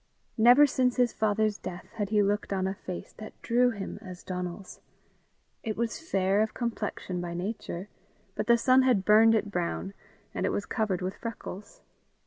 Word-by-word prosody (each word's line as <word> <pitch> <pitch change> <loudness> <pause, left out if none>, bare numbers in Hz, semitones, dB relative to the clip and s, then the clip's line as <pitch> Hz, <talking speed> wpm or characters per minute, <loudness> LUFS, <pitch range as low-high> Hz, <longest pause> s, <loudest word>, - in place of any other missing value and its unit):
Never 245 +6 +8
since 255 -3 +1
his 245 -2 +2
father's 215 0 +1
death 180 0 -8
had 205 -3 -3
he 210 -1 +3
looked 205 +1 -1
on 190 -1 0
a 190 - -1
face 185 -2 -8
that 215 - -10
drew 245 +1 +3
him 200 -5 -6
as 180 -1 -10
Donal's. 180 +1 -6 0.8
It 215 -1 -4
was 230 -1 -2
fair 195 -9 +1
of 220 - -1
complexion 210 -6 -3
by 170 -1 -5
nature, 185 -1 -4 0.5
but - - -3
the 235 0 +6
sun 255 +2 +5
had 245 -7 +2
burned 225 +2 +6
it 210 -1 -1
brown, 180 +2 -2 0.4
and - - -3
it - - +2
was 205 - -2
covered 195 -5 -1
with 185 +2 -3
freckles. 215 -3 -8
210 Hz, 175 wpm, -28 LUFS, 190-230 Hz, 0.8 s, Never